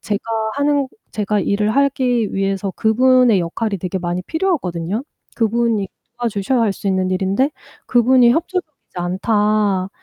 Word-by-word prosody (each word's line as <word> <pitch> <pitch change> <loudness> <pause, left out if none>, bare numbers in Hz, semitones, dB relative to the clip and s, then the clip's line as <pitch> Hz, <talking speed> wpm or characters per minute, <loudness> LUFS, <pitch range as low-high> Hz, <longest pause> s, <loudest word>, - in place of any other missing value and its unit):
제가 205 0 -3 0.3
하는 285 -1 +1 0.2
제가 210 -1 -1
일을 210 +2 0
하기 255 -5 +1
위해서 195 0 -1
그분의 245 -2 +4
역할이 200 +4 -2
되게 185 +2 -3
많이 175 +1 -3
필요하거든요. 215 - -2 0.3
"그분이 225 -3 +1 0.3
도와주셔야 235 +1 0
할 220 -3 +2
수 195 - -8
있는 190 -1 +1
일인데 195 +9 +1 0.4
그분이 245 0 +5
협조적이지 330 +1 -3
않다. 200 +1 +1
215 Hz, 325 characters per minute, -19 LUFS, 195-250 Hz, 0.4 s, 그분이